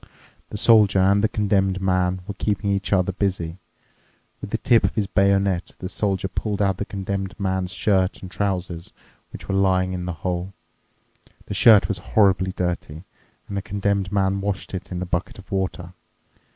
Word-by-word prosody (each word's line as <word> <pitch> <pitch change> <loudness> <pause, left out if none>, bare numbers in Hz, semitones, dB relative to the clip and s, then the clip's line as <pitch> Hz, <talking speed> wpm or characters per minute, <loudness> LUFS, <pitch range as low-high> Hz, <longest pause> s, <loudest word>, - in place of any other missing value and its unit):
The - - -5
Soldier 105 -3 +5
and 100 +2 +4
the 110 - +3
Condemned 95 -2 +1
Man 90 -1 0
were 100 - -5
keeping 100 0 -1
each 100 0 -1
other 95 -1 +2
busy. 95 -3 -2 0.8
With - - -6
the - - -1
tip 115 -2 +3
of - - 0
his 105 -3 +1
bayonet 100 -2 +1
the 90 - -5
Soldier 95 0 -1
pulled 105 +1 -3
out 100 -1 +1
the 105 - -3
Condemned 95 -1 -4
Man's 95 -2 -1
shirt 95 0 +1
and 95 - -8
trousers 90 -4 -3 0.4
which - - -10
were - - -2
lying 95 -1 +2
in 90 -1 -4
the 90 - -3
hole. 90 +1 -2 0.9
The - - -5
shirt 110 -4 +6
was - - -2
horribly 95 -3 +2
dirty, 90 -3 -4 0.4
and 100 - -6
the 100 - -1
Condemned 100 -1 -1
Man 100 -1 +1
washed 100 -1 -3
it 95 0 -6
in 90 - -3
the 90 - -3
bucket 90 0 -3
of 95 -1 -14
water. 90 -2 -3
95 Hz, 180 wpm, -23 LUFS, 90-100 Hz, 0.9 s, shirt